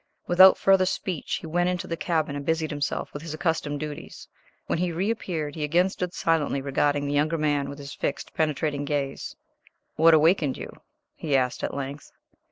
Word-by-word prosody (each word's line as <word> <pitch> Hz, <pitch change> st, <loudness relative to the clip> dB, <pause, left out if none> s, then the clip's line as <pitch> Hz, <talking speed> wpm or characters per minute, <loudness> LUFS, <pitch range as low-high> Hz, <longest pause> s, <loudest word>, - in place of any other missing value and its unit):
Without 185 Hz, +2 st, +7 dB
further 190 Hz, -1 st, +4 dB
speech 185 Hz, -3 st, -2 dB
he -, -, -7 dB
then 160 Hz, -, -8 dB
went 175 Hz, 0 st, +2 dB
into 180 Hz, 0 st, -2 dB
the 165 Hz, -, -3 dB
cabin 160 Hz, -4 st, -1 dB
and 145 Hz, -, -4 dB
busied 160 Hz, +1 st, 0 dB
himself 145 Hz, -1 st, -3 dB
with 145 Hz, -, -6 dB
his 160 Hz, -1 st, -6 dB
accustomed 155 Hz, -3 st, -1 dB
duties. 150 Hz, -1 st, -7 dB, 0.4 s
When -, -, -1 dB
he 180 Hz, 0 st, 0 dB
reappeared 175 Hz, -5 st, -2 dB
he 155 Hz, -, -4 dB
again 175 Hz, +5 st, +3 dB
stood 180 Hz, -2 st, -4 dB
silently 160 Hz, -4 st, +1 dB
regarding 145 Hz, +1 st, 0 dB
the 145 Hz, -, -2 dB
younger 155 Hz, +3 st, +1 dB
man 145 Hz, -2 st, 0 dB
with 140 Hz, -, -7 dB
his 140 Hz, -1 st, -8 dB
fixed, -, -, -4 dB
penetrating 150 Hz, -2 st, -1 dB
gaze. 140 Hz, -1 st, -3 dB, 0.6 s
"What 165 Hz, +1 st, +7 dB
awakened 155 Hz, -2 st, +3 dB
you?" -, -, -7 dB, 0.4 s
he 145 Hz, -4 st, 0 dB
asked, 125 Hz, -1 st, -1 dB
at -, -, -2 dB
length. 140 Hz, +1 st, -6 dB
155 Hz, 185 wpm, -26 LUFS, 145-170 Hz, 0.6 s, Without